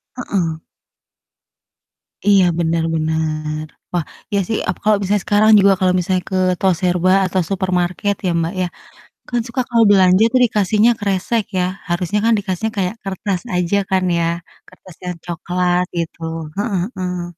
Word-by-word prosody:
Heeh. 180 -10 -2 1.7
Iya 200 -2 +5
benar 165 -1 +1
benar. 155 -1 -2 0.3
Wah, 175 -3 0 0.3
iya 200 - +2
sih, 225 - -1
aku 185 - -2
kalau 215 -1 +4
misalnya 200 0 0
sekarang 215 +1 +4
juga 200 0 +5
kalau 185 -1 +2
misalnya 180 +1 0
ke 190 - 0 0.2
toserba 180 -1 +2
atau 185 0 0
supermarket 185 0 0
ya - - +2
Mbak 165 +2 -2
ya, 180 - 0 0.6
kan 240 -1 0
suka 245 +2 -2
kalau 230 -1 +4
belanja 185 0 +5
tuh 255 - +4
dikasihnya 215 +1 +3
kresek 205 +3 0
ya. 180 - +2 0.3
Harusnya 180 +4 0
kan 230 - +4
dikasihnya 205 +2 -2
kayak 190 +2 -1
kertas 195 -1 -3
aja 180 +2 +1
kan 190 -1 +2 0.2
ya. - - +1 0.4
Kertas 185 -1 -16
yang 180 0 -3
coklat 180 +1 0
gitu. 170 0 -4 0.4
Heeh 205 -1 -1 0.2
heeh. 180 -1 -3
185 Hz, 150 wpm, -18 LUFS, 175-205 Hz, 1.7 s, Iya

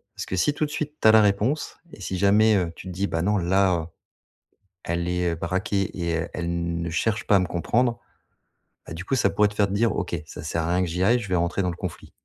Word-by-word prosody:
Parce - - -5
que 95 - -4
si 145 - +2
tout 155 - -1
de 150 - -7
suite 150 0 -3
tu - - -4
as 110 - +9
la 110 - +7
réponse 105 +8 +1 0.2
et - - -13
si 95 0 -4
jamais, 105 +3 +4
heu, 90 -4 0
tu 95 - -10
te 90 - -6
dis: 100 +2 -1
«Bah 85 0 -2
non 105 +2 +2
là, 95 +1 +2
heu, 80 -2 -3 1.0
elle 85 +1 -2
est, 90 -1 0
heu, - - -2
braquée 95 +3 -1
et 85 -1 -2
elle 80 0 -2
elle 85 0 -2
ne 85 - -3
cherche 110 +6 -1
pas 100 - +5
à - - +3
me 90 - 0
comprendre», 120 +7 0 0.9
bah - - -8
du 85 +3 -7
coup 135 - 0
ça 125 - +3
pourrait 105 0 +3
te 105 - -8
faire 105 -1 +3
te 100 - -5
dire: 110 +1 +1
«OK, 85 -5 -3
ça - - -9
sert 80 +2 -2
à 85 +2 0
rien 90 - +2
que 90 - -1
j'y 90 +3 -3
aille, 115 +6 +4
je 100 - -7
vais 90 - +1
rentrer 85 +3 0
dans 90 - 0
le 85 - -5
conflit.» 90 -3 -7
95 Hz, 280 wpm, -24 LUFS, 85-105 Hz, 1.0 s, as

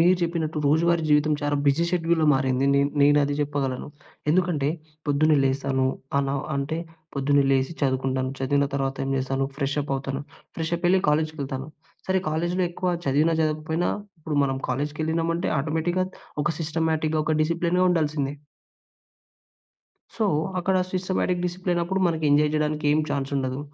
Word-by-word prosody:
మీరు 180 +2 +5
చెప్పినట్టు, 160 -2 -1
రోజువారి 165 +3 +3
జీవితం 150 +1 +4
చాలా 145 0 +1
బిజీ 145 +5 +3
షెడ్యూల్‌లో 165 -2 +1
మారింది. 130 0 +1
నేన్ 140 +1 +3
నేనది 145 0 +4
చెప్పగలను. 140 -2 -2 0.4
ఎందుకంటే, 170 -5 +2 0.4
పొద్దున్నే 150 +1 +3
లేస్తాను, 135 0 +1 0.3
అలా 140 0 0 0.2
అంటే, 150 +4 -2 0.4
పొద్దున్నే 140 +1 +3
లేసి 135 +3 +1
చదువుకుంటాను, 130 -1 0
చదివిన 140 +1 +1
తర్వాత 135 -1 -1
ఏం 135 - -2
చేస్తాను, 135 +1 -1
ఫ్రెష్ 140 0 -1
అప్పవుతాను. 135 0 -3 0.3
ఫ్రెష్ 165 0 -3
అప్పెళ్లి 180 +2 +3
కాలేజ్‌కెళ్తాను. 150 -3 -1 0.4
సరే 190 0 +2
కాలేజ్‌లో 175 +3 0
ఎక్కువ 180 +1 -1 0.2
చదివినా 150 +5 +3
చదవకపోయినా, 155 +2 0 0.3
ఇప్పుడు 150 -1 -3
మనం 135 -1 -1
కాలేజ్‌కెళ్ళినామంటే, 160 +5 -1
ఆటోమేటిక్‌గా 160 +5 0 0.4
ఒక 165 - +1
సిస్టమాటిక్‌గా, 160 -1 0
ఒక 155 - +2
డిసిప్లిన్‌గా 170 +3 +1
ఉండాల్సిందే. 150 -4 0 1.8
సో, 220 - +1 0.3
అక్కడ 185 +1 +1 0.2
సిస్టమాటిక్, 185 -1 0
డిసిప్లినప్పుడు, 180 +1 -1
మనకి 160 -2 -1
ఎంజాయ్ 150 +1 +4
జేయడానికేం 150 0 +1
చాన్సుండదు. 135 -1 -2
150 Hz, 125 wpm, -25 LUFS, 140-170 Hz, 1.8 s, మీరు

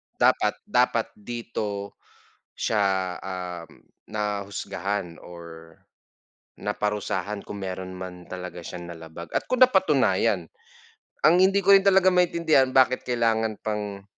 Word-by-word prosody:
Dapat - - +2
dapat - - +1
dito 105 -3 -5 0.6
siya, 95 -4 0
um, 90 -3 -7 0.3
nahusgahan 100 -3 -3
or 85 -1 -11 0.9
naparusahan 105 -1 -2
kung 100 - -7
meron 95 -1 -5
man 90 -1 -8
talaga 90 -1 -7
siyang 85 0 -7
nalabag 80 +1 -10
at - - 0
kung 255 - -1
napatunayan, 255 0 +3 0.8
ang 160 +3 +6
hindi 195 +1 +4
ko 200 - +5
rin 195 - +5
talaga 190 -1 +5
maintindihan 165 -7 +3
bakit 130 -1 +3
kailangan 115 -2 +1
pang, 105 -2 -4
100 Hz, 110 wpm, -25 LUFS, 90-120 Hz, 0.9 s, ang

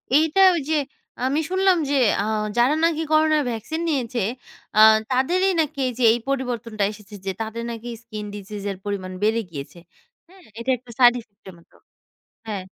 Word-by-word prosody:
এইটা 320 +5 +4
ঐ - - 0
যে 315 - +2 0.5
আমি 275 +4 +1
শুনলাম 375 0 +3
যে 285 - +1 0.3
আ - - 0 0.3
যারা 245 +5 +4
নাকি 325 -1 +1
করোনা 310 0 +4
ভ্যাকসিন 240 +8 -4
নিয়েছে 250 -5 -1 0.6
আ - - +6 0.3
তাদেরই 355 +10 +2
নাকি 290 -2 -4
এই - - -1
যে - - +1
এই 240 - -1
পরিবর্তনটা 240 -5 -2
এসেছে 210 -1 -12
যে 195 - -1
তাদের 225 +1 -4
নাকি 230 +1 -8 0.2
স্কিন 215 -2 -7
ডিসিজ 205 0 -8
এর 195 - -7
পরিমাণ 195 -2 -4
বেড়ে 220 +2 +2
গিয়েছে। 140 +2 -8 0.5
হুম 370 +1 -19 0.2
এটা 245 +3 -1
একটা 245 0 -15
সাইড 245 -1 +7
ইফেক্ট 205 -2 -29
এর - - -11
মতো। 170 - -25 0.7
হ্যাঁ। 205 -4 -4
240 Hz, 175 wpm, -23 LUFS, 215-310 Hz, 0.7 s, সাইড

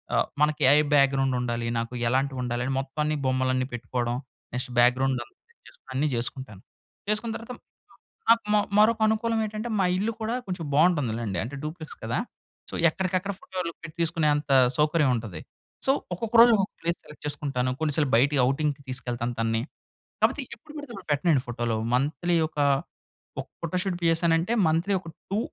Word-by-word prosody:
ఆహ్, - - +2
మనకి 150 0 +2
AI 150 +2 +6
background 135 -2 +3
ఉండాలి. 120 -1 -2
నాకు 115 +2 -3
ఎలాంటివి 130 +1 0
ఉండాలి 120 0 -2
అని 135 - -1
మొత్తాన్ని 150 +3 -2
బొమ్మలన్నీ 130 0 +1
పెట్టుకోవడం. 120 0 -2 0.4
నెక్స్ట్ 125 +1 -3
బ్యాక్‍గ్రౌండ్ 130 +2 +3
అంత - - -23 0.2
సేటచేసుకోవడం 470 +1 -21
అన్నీ 145 +4 +1
చేసుకుంటాను. 115 -4 -4 0.5
చేసుకున్న 220 +2 0
తర్వాత 230 +2 -8 0.8
నాకు 230 -1 +6 0.3
మరొక 220 +1 +5
అనుకూలం 225 +1 +1
ఏంటంటే, 215 +3 -4
మా 185 - +3
ఇల్లు 215 +4 0
కూడా 220 +2 -1
కొంచెం 180 -4 -4
బావుంటుంది 150 -8 +3
లెండి. 100 -6 -3
అంటే 135 +5 -6
డ్యూప్లెక్స్ 155 0 -7
కదా. - - -1 0.5
సో, - - -5
ఎక్కడికక్కడ 185 +3 -1
ఫోటోలు 180 -3 -4 0.3
తీసుకునే 165 -2 +2
అంత 145 -1 -3 0.3
సౌకర్యం 150 -3 +3
ఉంటది. 100 -8 -7 0.4
సో 270 - +5 0.2
ఒక్కొక్క 225 +5 -4
రోజు 235 0 +9
ఒక 195 - +2 0.2
ప్లేస్ 170 +1 -1
సెలెక్ట్ 150 - -14
చేసుకుంటాను. 135 -4 -1
కొన్ని 155 -2 0
సార్లు 150 -4 +2
బయటికి 140 +3 +3
ఔటింగ్‌కి 140 0 0
తీసుకెళ్తాను 120 -1 -3
తనని. 115 0 +1 0.6
కాకపోతే 285 - +2
ఎప్పుడు 300 +6 -16
పడితే 290 -5 -8 0.2
పెట్టనండి 145 -2 +2
ఫోటోలు. 120 -1 -1 0.2
మంత్‌లీ 160 +6 +1
ఒకా 145 -2 0 0.7
ఒక - - -5
ఫోటో 170 +2 -2
షూట్ 185 -3 -2
చేసానంటే, 165 +5 +2
మంత్‌లీ 170 +5 +1
ఒక 165 - -10 0.2
2 205 - +1
150 Hz, 155 wpm, -26 LUFS, 130-185 Hz, 0.8 s, రోజు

